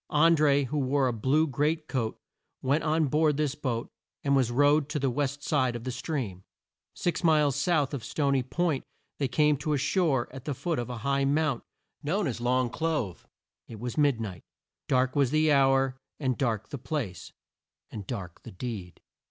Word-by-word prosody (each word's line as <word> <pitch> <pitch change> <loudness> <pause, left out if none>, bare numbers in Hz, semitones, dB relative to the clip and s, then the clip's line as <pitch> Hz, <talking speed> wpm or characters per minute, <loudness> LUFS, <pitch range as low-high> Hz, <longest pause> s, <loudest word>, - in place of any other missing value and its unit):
An 165 +2 +5
dré, 145 -2 +3
who 150 +4 -2
wore 135 0 +2
a 125 - 0
blue 135 +8 +2
great 150 +3 0
coat, 115 -5 -2 0.5
went 140 +4 +2
on 155 0 +2
board 150 +1 +2
this 150 -3 0
boat 125 -6 -3 0.3
and 140 -1 +3
was 130 -3 +3
rowed 145 +3 +3
to 155 - -2
the 135 -3 +1
west 145 +1 -2
side 130 -5 +1
of 120 - -5
the 130 - -3
stream. 125 - -4 0.5
Six 175 0 -1
miles 150 -4 +4
south 145 -1 +1
of 135 -6 -4
Sto 140 +3 0
ny 135 -1 +3
Point 155 +2 -1 0.4
they 140 - +1
came 150 +3 +3
to 150 +2 0
shore 145 -3 +1
at 135 -1 -9
the 145 - -2
foot 165 +2 -2
of 120 - -4
a 125 - -4
high 140 0 +2
mount 145 -2 +1 0.4
known 180 +7 0
as 120 -6 -2
the 120 - -5
Long 125 -1 +2
Clove. 150 - -2 0.4
It 110 - -9
was 120 +1 -4
mid 145 -6 +3
night. 100 -6 -5 0.5
Dark 130 0 +2
was 140 -3 +3
the 155 +2 +3
hour, 135 -1 +3 0.2
and 130 -4 0
dark 115 -6 -1
the 140 - -6
place, 120 - -4 0.6
and 100 -3 -7
dark 95 -8 -6
the - - -10
deed. 95 -3 -6
140 Hz, 195 wpm, -28 LUFS, 125-150 Hz, 0.6 s, An